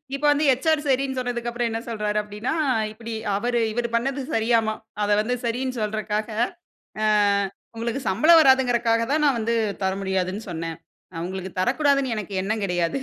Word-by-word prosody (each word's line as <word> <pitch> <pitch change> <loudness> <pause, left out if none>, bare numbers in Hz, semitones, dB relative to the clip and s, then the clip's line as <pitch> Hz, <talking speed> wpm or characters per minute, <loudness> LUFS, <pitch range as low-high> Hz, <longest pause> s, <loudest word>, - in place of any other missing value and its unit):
இப்போ 285 - -3
வந்து 295 +1 +2
ஹெச்.ஆர். 295 +4 +2
சரின்னு 265 0 +1
சொன்னதுக்கு 240 -1 -2
அப்புறம் 240 0 -1
என்ன 225 0 -2
சொல்றாரு 210 -2 -2
அப்டின்னா 210 +6 -4 0.4
இப்டி 230 +1 -8 0.2
அவரு 240 +2 0
இவரு 235 +1 -2
பண்ணது 270 +3 0
சரியாமா 225 -1 +2 0.3
அத 205 - 0
வந்து 245 +3 -1
சரின்னு 250 +2 -2
சொல்றக்காக, 215 0 -2 0.8
அ - - +2 0.7
"உங்களுக்கு 235 +4 -2
சம்பளம் 310 - +6
வராதுங்கிறக்காக 245 -4 +4
தான் 305 - +2
நான் 270 -4 +2
வந்து 230 +1 0 0.3
தர 190 0 +1
முடியாதுன்னு 190 +2 -1
சொன்னேன். 165 -1 -5 0.5
உங்களுக்கு 190 0 -6
தரக்கூடாதுன்னு 275 +2 +2
எனக்கு 205 -2 -5
எண்ணம் 215 +2 -2
கிடையாது." 175 +4 0
230 Hz, 150 wpm, -24 LUFS, 210-260 Hz, 0.8 s, சம்பளம்